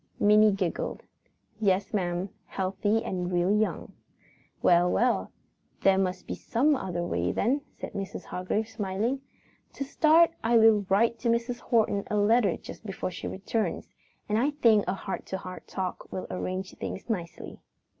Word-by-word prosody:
Minnie 210 Hz, +1 st, +6 dB
giggled. 190 Hz, -4 st, -2 dB, 0.6 s
"Yes, 200 Hz, +1 st, +1 dB
ma'am; 180 Hz, -1 st, -1 dB, 0.2 s
healthy 200 Hz, +3 st, 0 dB
and 180 Hz, -1 st, -3 dB
real 180 Hz, +3 st, +2 dB
young." 215 Hz, 0 st, -1 dB, 0.7 s
"Well, 175 Hz, 0 st, +5 dB
well, 245 Hz, +1 st, +1 dB, 0.5 s
there 195 Hz, 0 st, +4 dB
must 185 Hz, -1 st, -1 dB
be -, -, -4 dB
some 285 Hz, +6 st, +1 dB
other 180 Hz, -7 st, -3 dB
way 90 Hz, -, -1 dB
then," 265 Hz, +7 st, +1 dB, 0.2 s
said -, -, -6 dB
Mrs. 195 Hz, -1 st, -5 dB
Hargrave, 195 Hz, +4 st, -2 dB
smiling. 220 Hz, +5 st, -2 dB, 0.5 s
"To -, -, -4 dB
start, 320 Hz, +4 st, +4 dB
I 230 Hz, +1 st, +4 dB
will 220 Hz, -3 st, +5 dB
write 230 Hz, +4 st, +3 dB
Mrs. 235 Hz, +1 st, 0 dB
Horton 215 Hz, -4 st, +1 dB
a 210 Hz, -, 0 dB
letter 205 Hz, -2 st, +3 dB
just -, -, -11 dB
before 195 Hz, -3 st, -4 dB
she -, -, -6 dB
returns, 210 Hz, +3 st, -2 dB, 0.4 s
and 210 Hz, +1 st, +1 dB
I 270 Hz, +5 st, +2 dB
think 230 Hz, -8 st, +3 dB
a -, -, +1 dB
heart 195 Hz, 0 st, -5 dB
to 190 Hz, -, -3 dB
heart 185 Hz, -1 st, -9 dB
talk 185 Hz, -1 st, -5 dB
will 185 Hz, -, -4 dB
arrange 185 Hz, +1 st, -4 dB
things -, -, -5 dB
nicely." 180 Hz, -8 st, -5 dB
205 Hz, 155 wpm, -28 LUFS, 185-230 Hz, 0.7 s, Minnie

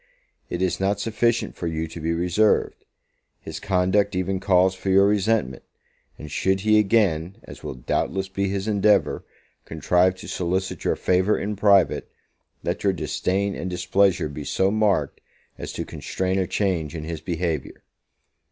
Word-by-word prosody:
It 90 Hz, +1 st, -2 dB
is 90 Hz, -, 0 dB
not 100 Hz, +1 st, 0 dB
sufficient 115 Hz, +2 st, 0 dB
for 85 Hz, -, -4 dB
you 80 Hz, 0 st, -2 dB
to 80 Hz, -, -8 dB
be 80 Hz, +1 st, -1 dB
reserved: 90 Hz, +6 st, +1 dB, 0.5 s
his 80 Hz, 0 st, -7 dB
conduct 95 Hz, +2 st, +1 dB
even 95 Hz, +1 st, -1 dB
calls 95 Hz, -1 st, +3 dB
for 95 Hz, +1 st, -5 dB
your 95 Hz, +1 st, +5 dB
resentment; 100 Hz, -, +1 dB, 0.6 s
and 75 Hz, -1 st, -9 dB
should 95 Hz, +4 st, 0 dB
he 110 Hz, +1 st, +4 dB
again, 95 Hz, -5 st, +1 dB
as -, -, -12 dB
will -, -, -6 dB
doubtless 95 Hz, +9 st, -2 dB
be 100 Hz, 0 st, -2 dB
his 100 Hz, +1 st, -3 dB
endeavour, 105 Hz, 0 st, +2 dB, 0.4 s
contrive 90 Hz, +4 st, +1 dB
to -, -, -11 dB
solicit 90 Hz, 0 st, -2 dB
your -, -, +2 dB
favour 95 Hz, +3 st, +2 dB
in 105 Hz, +1 st, -3 dB
private, 100 Hz, -2 st, +3 dB, 0.5 s
let -, -, -3 dB
your -, -, +3 dB
disdain 100 Hz, +2 st, -1 dB
and 95 Hz, -, -4 dB
displeasure 95 Hz, 0 st, +1 dB
be 75 Hz, 0 st, -7 dB
so 95 Hz, +6 st, +1 dB
marked, 100 Hz, -9 st, +1 dB, 0.4 s
as -, -, -5 dB
to -, -, -4 dB
constrain 95 Hz, +1 st, -2 dB
a 95 Hz, -, 0 dB
change 85 Hz, -6 st, -1 dB
in 80 Hz, -, -5 dB
his 80 Hz, 0 st, -5 dB
behaviour. 85 Hz, -4 st, -3 dB
95 Hz, 160 wpm, -23 LUFS, 85-100 Hz, 0.6 s, your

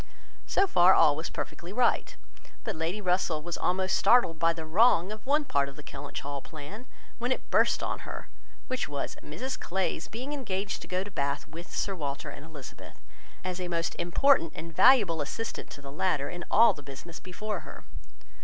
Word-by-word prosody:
So 390 Hz, -, +3 dB
far 185 Hz, -, +6 dB
all 145 Hz, -2 st, +6 dB
was 160 Hz, +2 st, -4 dB
perfectly 175 Hz, +2 st, -6 dB
right; 240 Hz, +4 st, +1 dB, 0.5 s
but 220 Hz, -4 st, -3 dB
Lady 165 Hz, +6 st, -2 dB
Russell 180 Hz, -5 st, +1 dB
was 175 Hz, 0 st, -3 dB
almost 185 Hz, +1 st, +1 dB
startled 235 Hz, -10 st, +4 dB
by 165 Hz, 0 st, +4 dB
the 165 Hz, -1 st, -5 dB
wrong 190 Hz, +2 st, +4 dB
of 215 Hz, 0 st, -7 dB
one 295 Hz, +2 st, +3 dB
part 140 Hz, -, +1 dB
of 140 Hz, -, -12 dB
the 150 Hz, -, -11 dB
Kellynch 140 Hz, 0 st, -7 dB
Hall 140 Hz, 0 st, -4 dB
plan, 175 Hz, -, -9 dB, 0.3 s
when 245 Hz, +2 st, -1 dB
it -, -, -3 dB
burst -, -, +3 dB
on -, -, -2 dB
her, -, -, -7 dB, 0.4 s
which 255 Hz, -10 st, -2 dB
was, 140 Hz, -1 st, -3 dB
Mrs 255 Hz, -, -5 dB
Clay's 185 Hz, -2 st, -1 dB
being 255 Hz, +6 st, -5 dB
engaged 200 Hz, -8 st, -3 dB
to -, -, -9 dB
go 185 Hz, +1 st, -1 dB
to 205 Hz, -, -10 dB
Bath 140 Hz, -4 st, -2 dB
with 165 Hz, +3 st, -10 dB
Sir 195 Hz, -, -1 dB
Walter 140 Hz, -4 st, -4 dB
and 145 Hz, -, -10 dB
Elizabeth, 155 Hz, -5 st, -11 dB, 0.4 s
as 185 Hz, 0 st, -3 dB
a 180 Hz, -, -2 dB
most 165 Hz, -1 st, -1 dB
important 175 Hz, -, +3 dB
and 165 Hz, -1 st, -8 dB
valuable 205 Hz, -, +6 dB
assistant 225 Hz, +10 st, -4 dB
to 145 Hz, -, -11 dB
the 140 Hz, -, -8 dB
latter 145 Hz, -2 st, 0 dB
in 175 Hz, -1 st, -6 dB
all 230 Hz, +2 st, +6 dB
the 145 Hz, -, -11 dB
business 145 Hz, +5 st, -9 dB
before 200 Hz, +2 st, -4 dB
her. 155 Hz, -, -11 dB
175 Hz, 190 wpm, -29 LUFS, 155-210 Hz, 0.5 s, far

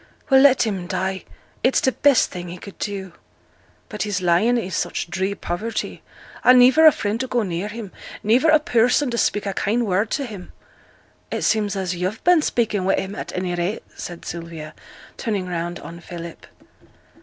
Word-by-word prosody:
'Well! 265 Hz, 0 st, +7 dB
let 265 Hz, -3 st, +6 dB
him 190 Hz, -5 st, -3 dB
die 190 Hz, +1 st, -2 dB, 0.4 s
it's 260 Hz, -, +4 dB
t' 260 Hz, -, +2 dB
best 280 Hz, 0 st, +3 dB
thing 175 Hz, -1 st, -6 dB
he 175 Hz, +1 st, -7 dB
could 200 Hz, +2 st, -12 dB
do!' 195 Hz, -3 st, -4 dB, 0.7 s
'But 210 Hz, -, -7 dB
he's 205 Hz, -3 st, -1 dB
lying 185 Hz, +7 st, +3 dB
i' 210 Hz, -5 st, -3 dB
such 175 Hz, -2 st, -3 dB
dree 190 Hz, +3 st, -1 dB
poverty, 215 Hz, +7 st, -4 dB, 0.4 s
and 250 Hz, +1 st, +7 dB
niver 260 Hz, +6 st, +7 dB
a -, -, +10 dB
friend 215 Hz, -3 st, -2 dB
to 260 Hz, -, -2 dB
go 245 Hz, -2 st, 0 dB
near 180 Hz, 0 st, -3 dB
him, 210 Hz, -2 st, -7 dB, 0.3 s
niver 245 Hz, +9 st, +4 dB
a 310 Hz, -, +7 dB
person 250 Hz, 0 st, +2 dB
to 235 Hz, -, -2 dB
speak 205 Hz, -, +1 dB
a 195 Hz, -, -2 dB
kind 230 Hz, +5 st, 0 dB
word 205 Hz, +2 st, +1 dB
t' 280 Hz, -, -1 dB
him.' 205 Hz, -7 st, -10 dB, 0.8 s
'It -, -, -3 dB
seems 210 Hz, -2 st, +1 dB
as 185 Hz, -2 st, -2 dB
yo've 185 Hz, +5 st, -3 dB
been 350 Hz, -2 st, +5 dB
speaking 225 Hz, -8 st, 0 dB
wi' 195 Hz, -, +2 dB
him, 190 Hz, +1 st, -3 dB
at -, -, -6 dB
any 180 Hz, -1 st, -2 dB
rate,' 175 Hz, +4 st, -2 dB
said 175 Hz, -1 st, -8 dB
Sylvia, 165 Hz, -2 st, -7 dB, 0.4 s
turning 205 Hz, -6 st, -2 dB
round 175 Hz, 0 st, -3 dB
on 170 Hz, 0 st, -10 dB
Philip. 170 Hz, -1 st, -9 dB
200 Hz, 185 wpm, -22 LUFS, 180-235 Hz, 0.8 s, a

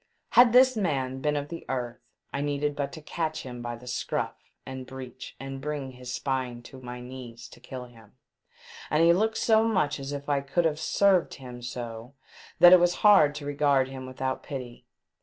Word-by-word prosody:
Had 245 Hz, -1 st, +7 dB
this 255 Hz, +1 st, +6 dB
man 135 Hz, -10 st, -1 dB
been 150 Hz, +1 st, +1 dB
of 145 Hz, 0 st, -3 dB
the 170 Hz, -, -7 dB
earth 125 Hz, -2 st, -3 dB, 0.3 s
I 140 Hz, -, -1 dB
needed 145 Hz, 0 st, -1 dB
but 140 Hz, -1 st, -2 dB
to 155 Hz, -, -9 dB
catch 160 Hz, 0 st, -3 dB
him 125 Hz, -2 st, -7 dB
by 120 Hz, 0 st, -4 dB
the 120 Hz, +1 st, -14 dB
scroff 120 Hz, -, -2 dB, 0.3 s
and 130 Hz, -1 st, -7 dB
breech 130 Hz, -1 st, -9 dB
and 135 Hz, 0 st, -6 dB
bring 145 Hz, -2 st, -4 dB
his 125 Hz, -1 st, -8 dB
spine 130 Hz, -3 st, -2 dB
to 130 Hz, +2 st, -12 dB
my 125 Hz, 0 st, -7 dB
knee 125 Hz, -1 st, -9 dB
to 120 Hz, +1 st, -13 dB
kill 125 Hz, 0 st, -8 dB
him. 115 Hz, -4 st, -18 dB, 0.8 s
And 155 Hz, +2 st, +3 dB
he 170 Hz, 0 st, +7 dB
looked 220 Hz, +5 st, +1 dB
so 220 Hz, -1 st, +4 dB
much 170 Hz, -10 st, +1 dB
as 135 Hz, +1 st, -5 dB
if 140 Hz, 0 st, -5 dB
I 140 Hz, -1 st, +1 dB
could 140 Hz, +5 st, 0 dB
have 155 Hz, -1 st, +1 dB
served 195 Hz, 0 st, +2 dB
him 125 Hz, -2 st, -10 dB
so 120 Hz, +1 st, -7 dB, 0.4 s
that 175 Hz, +1 st, +9 dB
it 185 Hz, -, +9 dB
was 175 Hz, 0 st, +3 dB
hard 155 Hz, -9 st, +7 dB
to 150 Hz, -1 st, -6 dB
regard 140 Hz, -2 st, +2 dB
him 130 Hz, -1 st, -7 dB
v/ithout 130 Hz, 0 st, -3 dB
pity. 125 Hz, -4 st, -8 dB
135 Hz, 195 wpm, -27 LUFS, 125-150 Hz, 0.8 s, that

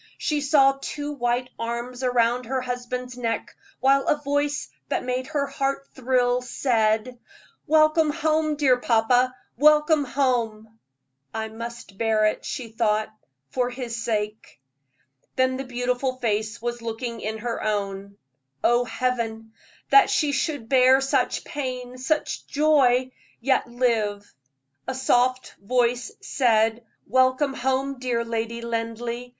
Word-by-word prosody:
She 300 Hz, -1 st, -1 dB
saw 275 Hz, -1 st, +4 dB
two 290 Hz, +1 st, -4 dB
white 250 Hz, -2 st, -1 dB
arms 235 Hz, +2 st, -4 dB
around 245 Hz, -1 st, +1 dB
her 260 Hz, +1 st, -1 dB
husband's 250 Hz, 0 st, -4 dB
neck, 230 Hz, -3 st, -3 dB, 0.2 s
while 275 Hz, +1 st, +3 dB
a 295 Hz, -, +2 dB
voice 290 Hz, 0 st, -1 dB, 0.2 s
that -, -, -1 dB
made 255 Hz, +1 st, -2 dB
her 290 Hz, -2 st, -1 dB
heart 275 Hz, 0 st, -2 dB
thrill 250 Hz, -1 st, +1 dB
said: 235 Hz, -1 st, 0 dB, 0.5 s
"Welcome 310 Hz, +1 st, +4 dB
home, 310 Hz, 0 st, +1 dB
dear 270 Hz, -4 st, +3 dB
papa 245 Hz, +2 st, +2 dB, 0.2 s
welcome 300 Hz, +1 st, +5 dB
home!" 225 Hz, -5 st, -1 dB, 0.6 s
"I 220 Hz, 0 st, -3 dB
must 230 Hz, -3 st, -9 dB
bear 220 Hz, -1 st, +2 dB
it," 215 Hz, -, 0 dB
she 250 Hz, -5 st, -5 dB
thought, 215 Hz, -1 st, 0 dB, 0.4 s
"for 250 Hz, -1 st, 0 dB
his 245 Hz, -2 st, -5 dB
sake." 215 Hz, -, -3 dB, 0.8 s
Then 260 Hz, 0 st, +2 dB
the 270 Hz, -, -5 dB
beautiful 250 Hz, +1 st, -1 dB
face 220 Hz, -2 st, -1 dB
was 240 Hz, 0 st, -4 dB
looking 230 Hz, +1 st, -5 dB
in 220 Hz, +1 st, -3 dB
her 230 Hz, +1 st, -4 dB
own. 200 Hz, -1 st, -3 dB, 0.5 s
Oh, 240 Hz, +1 st, +3 dB
Heaven! 225 Hz, -3 st, -2 dB, 0.4 s
that 415 Hz, -, +7 dB
she 300 Hz, -3 st, +2 dB
should 280 Hz, -3 st, -2 dB
bear 260 Hz, 0 st, +5 dB
such 270 Hz, 0 st, 0 dB
pain, 255 Hz, -3 st, -5 dB
such 300 Hz, +4 st, -1 dB
joy, 265 Hz, -4 st, +3 dB, 0.3 s
yet 265 Hz, +1 st, +1 dB
live. 220 Hz, -4 st, -1 dB, 0.5 s
A 260 Hz, -, -2 dB
soft 255 Hz, 0 st, +1 dB
voice 240 Hz, +2 st, 0 dB
said: 225 Hz, -2 st, +2 dB, 0.2 s
"Welcome 260 Hz, +2 st, +2 dB
home, 265 Hz, +1 st, -1 dB
dear 240 Hz, -2 st, -1 dB
Lady 230 Hz, 0 st, -3 dB
Linleigh. 235 Hz, +1 st, -4 dB
250 Hz, 130 wpm, -24 LUFS, 230-270 Hz, 0.8 s, that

